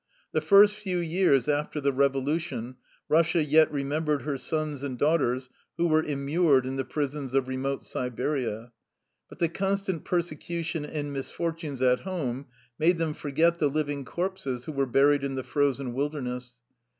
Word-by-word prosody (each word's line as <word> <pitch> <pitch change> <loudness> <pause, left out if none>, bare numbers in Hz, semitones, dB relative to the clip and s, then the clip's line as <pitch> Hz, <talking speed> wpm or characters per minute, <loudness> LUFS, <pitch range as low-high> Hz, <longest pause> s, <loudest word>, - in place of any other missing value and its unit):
The - - +1
first 205 +1 +6
few 190 -4 -2
years 170 -6 +2
after 150 +1 0
the 140 -1 +1
revolution 135 -2 0 0.3
Eussia 165 0 +3
yet 155 +2 +5
remembered 145 0 -1
her 145 0 -2
sons 150 +1 -3
and 135 -3 -4
daughters 135 -4 +1 0.3
who 170 0 +2
were 155 -1 +4
immured 140 -1 +2
in 130 +1 -3
the 135 - -1
prisons 140 -2 -3
of 135 -1 +2
remote 135 +1 -3
Siberia. 125 -2 -3 0.6
But - - -12
the 170 - +2
constant 195 0 -2
persecution 165 -2 -2
and 145 -1 -4
misfortunes 150 0 -3
at 125 0 +4
home 140 -8 -4 0.3
made 170 +3 +4
them 165 -2 -1
forget 160 +4 +1
the 150 - +3
living 145 -1 -2
corpses 140 -5 -3
who - - -4
were 140 -2 0
buried 140 +3 +4
in 135 -1 -2
the 130 - -3
frozen 140 -3 0
wilderness. 125 -3 -3
145 Hz, 155 wpm, -27 LUFS, 135-165 Hz, 0.6 s, first